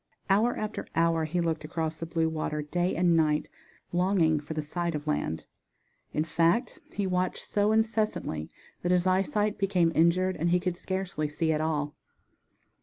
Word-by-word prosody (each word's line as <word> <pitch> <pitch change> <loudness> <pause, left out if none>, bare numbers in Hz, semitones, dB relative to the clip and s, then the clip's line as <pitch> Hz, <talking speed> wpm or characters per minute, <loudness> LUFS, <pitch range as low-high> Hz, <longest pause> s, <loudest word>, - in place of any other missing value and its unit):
Hour 220 +5 +3
after 215 0 -4
hour 165 -1 +2
he 170 +3 -1
looked 165 -2 -1
across 160 0 -3
the 165 - -4
blue 165 -1 +1
water, 155 -1 -2
day 175 +4 0
and 175 0 +3
night, 155 -2 +2 0.5
longing 175 -4 +3
for 150 +2 -7
the 155 - -1
sight 170 +2 -2
of 150 0 -4
land. 115 - -2 0.7
In 150 - 0
fact, 170 +9 +1
he 200 - -2
watched 180 -1 -1
so 205 +1 +2
incessantly 220 - 0 0.3
that 175 - 0
his 180 0 +3
eyesight 205 +3 +1
became 185 -4 +2
injured 180 +3 +3
and 170 +3 +1
he 180 +1 +3
could 180 -1 -2
scarcely 185 -4 -3
see 160 +2 0
at 155 - 0
all. 150 -2 -1
170 Hz, 170 wpm, -28 LUFS, 155-185 Hz, 0.7 s, Hour